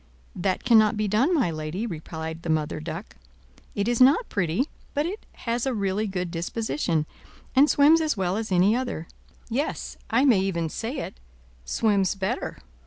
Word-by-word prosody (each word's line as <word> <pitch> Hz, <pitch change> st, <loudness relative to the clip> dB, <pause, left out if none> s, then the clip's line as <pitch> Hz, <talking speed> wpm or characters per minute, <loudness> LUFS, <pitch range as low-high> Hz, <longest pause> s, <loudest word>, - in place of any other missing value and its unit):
"That 185 Hz, +1 st, -1 dB
cannot 220 Hz, -3 st, +5 dB
be 215 Hz, 0 st, 0 dB
done, 225 Hz, -, +2 dB
my 265 Hz, -, +2 dB
lady," 155 Hz, +7 st, -4 dB
replied 160 Hz, -3 st, -6 dB
the 170 Hz, -, -6 dB
Mother 155 Hz, -1 st, 0 dB
Duck. 165 Hz, +5 st, -7 dB, 0.6 s
"It 200 Hz, +1 st, 0 dB
is 240 Hz, +1 st, +1 dB
not 280 Hz, -, +5 dB
pretty, 190 Hz, -, 0 dB, 0.3 s
but 290 Hz, +1 st, +1 dB
it 390 Hz, +6 st, -5 dB, 0.2 s
has 235 Hz, +2 st, 0 dB
a 260 Hz, -, 0 dB
really 200 Hz, +1 st, 0 dB
good 180 Hz, -3 st, -3 dB
disposition, 170 Hz, -, -1 dB, 0.5 s
and 280 Hz, +3 st, +6 dB
swims 305 Hz, +3 st, +6 dB
as 310 Hz, -7 st, 0 dB
well 185 Hz, -1 st, 0 dB
as 220 Hz, -1 st, -3 dB
any 185 Hz, +4 st, +4 dB
other; 245 Hz, -10 st, -3 dB, 0.4 s
yes, 265 Hz, +6 st, -3 dB
I 265 Hz, -, +3 dB
may 240 Hz, -8 st, +5 dB
even 170 Hz, -4 st, -1 dB
say 235 Hz, -, -4 dB
it, -, -, -7 dB, 0.5 s
swims 200 Hz, -, +1 dB
better. 195 Hz, -1 st, -3 dB
205 Hz, 170 wpm, -25 LUFS, 170-245 Hz, 0.6 s, and